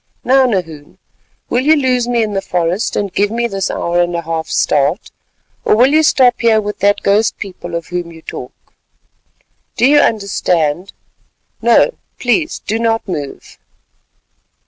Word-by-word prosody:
Now, 265 Hz, 0 st, +4 dB
Nahoon, 165 Hz, -9 st, -4 dB, 0.5 s
will 245 Hz, -, 0 dB
you 305 Hz, +4 st, +4 dB
lose 255 Hz, -4 st, +1 dB
me 240 Hz, -2 st, +1 dB
in 210 Hz, -1 st, -3 dB
the 195 Hz, -, -1 dB
forest 180 Hz, +2 st, -1 dB
and 200 Hz, -3 st, -2 dB
give 205 Hz, +1 st, +1 dB
me 235 Hz, +2 st, -1 dB
this 195 Hz, -3 st, -3 dB
hour 175 Hz, +1 st, 0 dB
and 175 Hz, 0 st, -1 dB
a 170 Hz, -, -3 dB
half's 165 Hz, 0 st, -3 dB
start—or 150 Hz, +8 st, -2 dB
will 255 Hz, +6 st, +4 dB
you 310 Hz, -, +5 dB
stop 255 Hz, -5 st, +3 dB
here 225 Hz, -2 st, +4 dB
with 210 Hz, -1 st, -5 dB
that 200 Hz, +1 st, +2 dB
ghost 210 Hz, +3 st, +2 dB
people 180 Hz, -3 st, -7 dB
of 170 Hz, -, -4 dB
whom 175 Hz, -1 st, -4 dB
you 160 Hz, -1 st, -14 dB
talk? -, -, -10 dB, 1.0 s
Do 240 Hz, -, +3 dB
you 290 Hz, +2 st, +5 dB
understand? 185 Hz, -, 0 dB, 0.7 s
No, -, -, +4 dB, 0.3 s
please 305 Hz, +7 st, 0 dB
do 220 Hz, +2 st, -1 dB
not 225 Hz, -1 st, 0 dB
move." 145 Hz, -7 st, -7 dB
205 Hz, 155 wpm, -15 LUFS, 175-240 Hz, 1.0 s, you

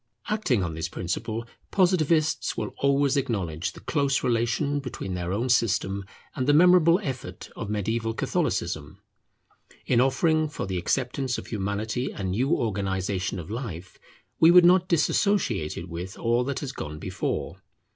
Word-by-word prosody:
Acting 175 Hz, -, +1 dB
on 85 Hz, -2 st, -3 dB
this 80 Hz, +1 st, -4 dB
principle, 110 Hz, +7 st, -3 dB, 0.2 s
Positivists 165 Hz, -4 st, +2 dB
will -, -, -3 dB
always 140 Hz, 0 st, +2 dB
acknowledge 100 Hz, -, -2 dB
the -, -, -13 dB
close 140 Hz, -3 st, 0 dB
relation 120 Hz, +5 st, +1 dB
between 130 Hz, -8 st, -5 dB
their 90 Hz, 0 st, -3 dB
own 115 Hz, +6 st, -1 dB
system 100 Hz, -5 st, +1 dB, 0.3 s
and 130 Hz, -, -2 dB
the 145 Hz, -, +5 dB
memorable 175 Hz, +1 st, +6 dB
effort 130 Hz, -6 st, -6 dB
of 110 Hz, -, -5 dB
mediaeval 110 Hz, +2 st, -1 dB
Catholicism. -, -, -2 dB, 0.9 s
In 120 Hz, -1 st, +3 dB
offering 155 Hz, +4 st, +2 dB
for 145 Hz, -, -4 dB
the 95 Hz, -1 st, -2 dB
acceptance 130 Hz, +6 st, -1 dB
of -, -, -7 dB
Humanity 110 Hz, +4 st, -2 dB
a 100 Hz, -, -7 dB
new 100 Hz, +9 st, 0 dB
organization 95 Hz, -, -1 dB
of 85 Hz, +1 st, -7 dB
life, 95 Hz, -7 st, -6 dB, 0.4 s
we 165 Hz, -, +7 dB
would 175 Hz, 0 st, +8 dB
not 180 Hz, +1 st, +5 dB
dissociate 160 Hz, -, +1 dB
it 85 Hz, -, -6 dB
with 90 Hz, +4 st, -6 dB
all 120 Hz, +1 st, +1 dB
that 140 Hz, 0 st, -3 dB
has 140 Hz, -3 st, -4 dB
gone 75 Hz, -, -6 dB
before. -, -, -4 dB
120 Hz, 150 wpm, -26 LUFS, 95-145 Hz, 0.9 s, would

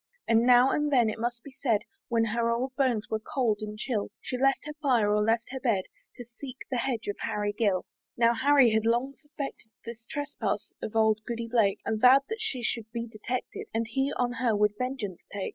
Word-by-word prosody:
And 230 Hz, +1 st, +4 dB
now 250 Hz, +1 st, +6 dB
and 295 Hz, 0 st, 0 dB
then, 240 Hz, -5 st, +4 dB
it 215 Hz, -, -8 dB
must 240 Hz, 0 st, -3 dB
be 280 Hz, -, -11 dB
said, 235 Hz, -6 st, 0 dB, 0.2 s
When 230 Hz, -1 st, +2 dB
her 230 Hz, +1 st, 0 dB
old 255 Hz, +3 st, -1 dB
bones 250 Hz, -6 st, +1 dB
were 220 Hz, -, 0 dB
cold 225 Hz, -2 st, 0 dB
and 210 Hz, 0 st, -6 dB
chill, 215 Hz, -2 st, -2 dB
She -, -, -5 dB
left 270 Hz, +2 st, +2 dB
her 300 Hz, -, -5 dB
fire, 235 Hz, -8 st, +3 dB
or 210 Hz, -, +3 dB
left 225 Hz, +3 st, +1 dB
her 265 Hz, -, -4 dB
bed, 225 Hz, -7 st, +1 dB, 0.3 s
To 245 Hz, -, -9 dB
seek 250 Hz, +2 st, -10 dB
the 255 Hz, -, 0 dB
hedge 235 Hz, -2 st, -2 dB
of 205 Hz, -, -3 dB
Harry 205 Hz, 0 st, -2 dB
Gill. 205 Hz, -5 st, +1 dB, 0.3 s
Now 235 Hz, 0 st, +4 dB
Harry 270 Hz, 0 st, +5 dB
he -, -, -1 dB
had 220 Hz, 0 st, +2 dB
long 240 Hz, +4 st, +1 dB
suspected 290 Hz, -6 st, -7 dB, 0.2 s
This 230 Hz, 0 st, -8 dB
trespass 290 Hz, 0 st, -3 dB
of 220 Hz, -, -5 dB
old 220 Hz, -1 st, +4 dB
Goody 235 Hz, -1 st, -3 dB
Blake, 225 Hz, -4 st, +2 dB
And 220 Hz, -1 st, -1 dB
vow'd 260 Hz, +2 st, +7 dB
that 445 Hz, 0 st, -4 dB
she 265 Hz, -, -2 dB
should 225 Hz, -2 st, -2 dB
be 235 Hz, 0 st, -3 dB
detected, 235 Hz, +2 st, -5 dB
And 230 Hz, +1 st, +1 dB
he 270 Hz, +5 st, 0 dB
on 245 Hz, -1 st, 0 dB
her 230 Hz, -2 st, +1 dB
would 210 Hz, 0 st, +3 dB
vengeance 250 Hz, -7 st, -4 dB
take. 200 Hz, -1 st, -3 dB
235 Hz, 220 wpm, -28 LUFS, 220-260 Hz, 0.3 s, vow'd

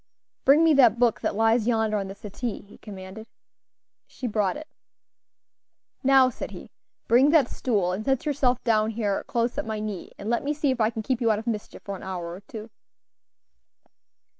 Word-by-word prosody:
"Bring 285 Hz, +4 st, +6 dB
me 325 Hz, -1 st, +5 dB
that 240 Hz, -5 st, +5 dB
book 235 Hz, -2 st, +2 dB
that -, -, -1 dB
lies 225 Hz, +1 st, +2 dB
yonder 220 Hz, -2 st, +1 dB
on 195 Hz, -1 st, -3 dB
the 195 Hz, -, -8 dB
settee," 210 Hz, +2 st, -5 dB
he 205 Hz, -, -18 dB
commanded. 200 Hz, +1 st, -10 dB, 0.8 s
She 255 Hz, -, -8 dB
brought 210 Hz, -3 st, 0 dB
it. 310 Hz, +1 st, -9 dB, 1.4 s
"Now," 270 Hz, -1 st, +6 dB
said -, -, -6 dB
he, -, -, -11 dB, 0.4 s
"bring 255 Hz, +5 st, +5 dB
that 310 Hz, -2 st, +4 dB
stool 200 Hz, -8 st, 0 dB
and 190 Hz, +4 st, -3 dB
set 270 Hz, 0 st, 0 dB
yourself 270 Hz, -4 st, +1 dB
down 220 Hz, -2 st, +2 dB
here 210 Hz, -3 st, -1 dB
close 235 Hz, +3 st, -1 dB
at 295 Hz, -, -3 dB
my 220 Hz, -1 st, -3 dB
knee, 210 Hz, -4 st, -5 dB
and 200 Hz, -, -8 dB
let 235 Hz, +1 st, 0 dB
me 295 Hz, +2 st, -1 dB
see 290 Hz, -2 st, +1 dB
if 250 Hz, -3 st, -2 dB
I 215 Hz, -, +3 dB
can 225 Hz, -1 st, -5 dB
keep 255 Hz, +1 st, -1 dB
you 230 Hz, -, +2 dB
out 215 Hz, -, +2 dB
of 220 Hz, -, -6 dB
mischief 220 Hz, -3 st, -5 dB
for 200 Hz, -, -5 dB
an -, -, -10 dB
hour 180 Hz, -3 st, -5 dB
or 175 Hz, -, -8 dB
two." 215 Hz, +1 st, -10 dB
225 Hz, 195 wpm, -25 LUFS, 210-255 Hz, 1.4 s, Bring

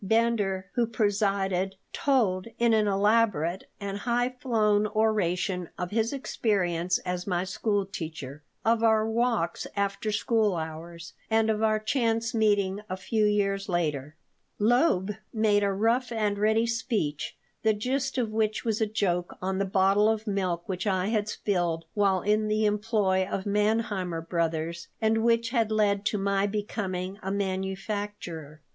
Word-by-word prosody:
Bender, 200 Hz, -3 st, +1 dB
who 240 Hz, -2 st, +1 dB
presided, 200 Hz, -3 st, 0 dB, 0.2 s
told, 225 Hz, -9 st, +1 dB
in 235 Hz, -1 st, +3 dB
an 215 Hz, -1 st, +3 dB
elaborate 200 Hz, -4 st, +2 dB
and 200 Hz, 0 st, -4 dB
high 245 Hz, +2 st, 0 dB
flown 215 Hz, -4 st, +2 dB
oration, 195 Hz, -4 st, 0 dB
of 180 Hz, 0 st, -4 dB
his 225 Hz, +1 st, +1 dB
experiences 180 Hz, -10 st, 0 dB
as 180 Hz, 0 st, -3 dB
my 180 Hz, -2 st, 0 dB
school 200 Hz, +1 st, -1 dB
teacher, 155 Hz, -6 st, -7 dB, 0.2 s
of 225 Hz, 0 st, +3 dB
our 220 Hz, -1 st, +3 dB
walks 225 Hz, -6 st, 0 dB
after 200 Hz, +1 st, -1 dB
school 215 Hz, -2 st, +1 dB
hours, 165 Hz, +1 st, -7 dB, 0.2 s
and 220 Hz, 0 st, +3 dB
of 215 Hz, 0 st, -1 dB
our 215 Hz, -1 st, +3 dB
chance 230 Hz, 0 st, 0 dB
meeting 205 Hz, -3 st, +2 dB
a 185 Hz, -, -3 dB
few 215 Hz, +3 st, 0 dB
years 200 Hz, -1 st, +1 dB
later 150 Hz, -4 st, -1 dB, 0.4 s
Loeb 215 Hz, -, +3 dB, 0.2 s
made 215 Hz, -2 st, +2 dB
a 200 Hz, -, +2 dB
rough 230 Hz, +5 st, +1 dB
and 210 Hz, -3 st, 0 dB
ready 220 Hz, +2 st, +3 dB
speech, 225 Hz, -, -2 dB, 0.2 s
the 220 Hz, -, +3 dB
gist 260 Hz, +6 st, -1 dB
of 235 Hz, -4 st, 0 dB
which 215 Hz, 0 st, 0 dB
was 225 Hz, -1 st, 0 dB
a 220 Hz, -, +3 dB
joke 180 Hz, -5 st, -1 dB
on 190 Hz, +1 st, -2 dB
the 200 Hz, -, +1 dB
bottle 195 Hz, +2 st, +3 dB
of 220 Hz, 0 st, -1 dB
milk 185 Hz, -5 st, -1 dB
which 190 Hz, +2 st, -3 dB
I 190 Hz, 0 st, +1 dB
had 215 Hz, -2 st, 0 dB
spilled 175 Hz, -6 st, -1 dB
while 195 Hz, -3 st, +2 dB
in 215 Hz, +1 st, +2 dB
the 215 Hz, 0 st, +1 dB
employ 210 Hz, -3 st, +1 dB
of 190 Hz, -, -3 dB
Manheimer 205 Hz, -4 st, 0 dB
Brothers 170 Hz, 0 st, -2 dB
and 220 Hz, 0 st, +2 dB
which 230 Hz, 0 st, +2 dB
had 230 Hz, -3 st, +1 dB
led 205 Hz, -2 st, +2 dB
to 215 Hz, -, 0 dB
my 200 Hz, 0 st, +1 dB
becoming 200 Hz, -2 st, -3 dB
a 190 Hz, -, -4 dB
manufacturer. 190 Hz, -5 st, -4 dB
205 Hz, 150 wpm, -27 LUFS, 185-220 Hz, 0.4 s, in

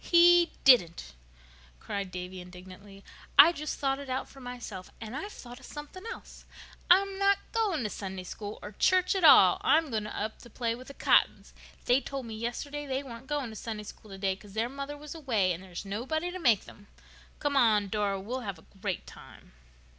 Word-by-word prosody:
"He 345 Hz, 0 st, +6 dB
didn't," 170 Hz, -, +4 dB, 0.7 s
cried 200 Hz, -2 st, -4 dB
Davy 180 Hz, +1 st, -7 dB
indignantly. 185 Hz, +2 st, -13 dB, 0.3 s
"I 295 Hz, +4 st, +10 dB
just 305 Hz, -2 st, -5 dB
thought 270 Hz, -1 st, 0 dB
it 280 Hz, -1 st, -8 dB
out 255 Hz, +1 st, -2 dB
for 275 Hz, -, -15 dB
myself. 245 Hz, -7 st, -8 dB
And 225 Hz, +2 st, -7 dB
I've 400 Hz, +8 st, -5 dB
thought 245 Hz, -6 st, -11 dB
of -, -, -14 dB
something 295 Hz, +6 st, -9 dB
else. -, -, -11 dB, 0.5 s
I'm 390 Hz, +2 st, +4 dB
not 395 Hz, 0 st, +4 dB
going 405 Hz, -, 0 dB
to 210 Hz, -, -1 dB
Sunday 190 Hz, -2 st, -6 dB
School 205 Hz, +3 st, -7 dB
or 205 Hz, -, -7 dB
church 365 Hz, -, +3 dB
at 385 Hz, -2 st, -1 dB
all. -, -, +8 dB
I'm 315 Hz, -3 st, +3 dB
going 215 Hz, -2 st, -2 dB
up 215 Hz, +1 st, -4 dB
to 240 Hz, -, -14 dB
play 230 Hz, 0 st, -2 dB
with 255 Hz, +2 st, -10 dB
the 275 Hz, -, -10 dB
Cottons. -, -, +2 dB, 0.3 s
They 250 Hz, +2 st, +4 dB
told 275 Hz, -2 st, -5 dB
me 225 Hz, -, -7 dB
yesterday 285 Hz, +6 st, -4 dB
they 265 Hz, +1 st, -2 dB
weren't 240 Hz, -1 st, -10 dB
going 285 Hz, -5 st, -2 dB
to -, -, -10 dB
Sunday 215 Hz, 0 st, -5 dB
School 210 Hz, +1 st, -12 dB
today, 195 Hz, -1 st, -2 dB
'cause 200 Hz, 0 st, -15 dB
their 225 Hz, +3 st, -1 dB
mother 280 Hz, +2 st, -6 dB
was 295 Hz, 0 st, -9 dB
away 225 Hz, -, +1 dB
and 170 Hz, -, -7 dB
there 190 Hz, -, -13 dB
was 175 Hz, +2 st, -7 dB
nobody 265 Hz, -, -2 dB
to 370 Hz, -, -6 dB
make 240 Hz, -, +3 dB
them. 205 Hz, -1 st, -15 dB, 0.5 s
Come 290 Hz, -1 st, -1 dB
along, 215 Hz, -6 st, +4 dB
Dora, 200 Hz, -1 st, -1 dB
we'll 235 Hz, +7 st, -4 dB
have 200 Hz, -6 st, -5 dB
a 160 Hz, -, -19 dB, 0.2 s
great 195 Hz, -4 st, -3 dB
time." -, -, -14 dB
240 Hz, 200 wpm, -29 LUFS, 200-290 Hz, 0.7 s, I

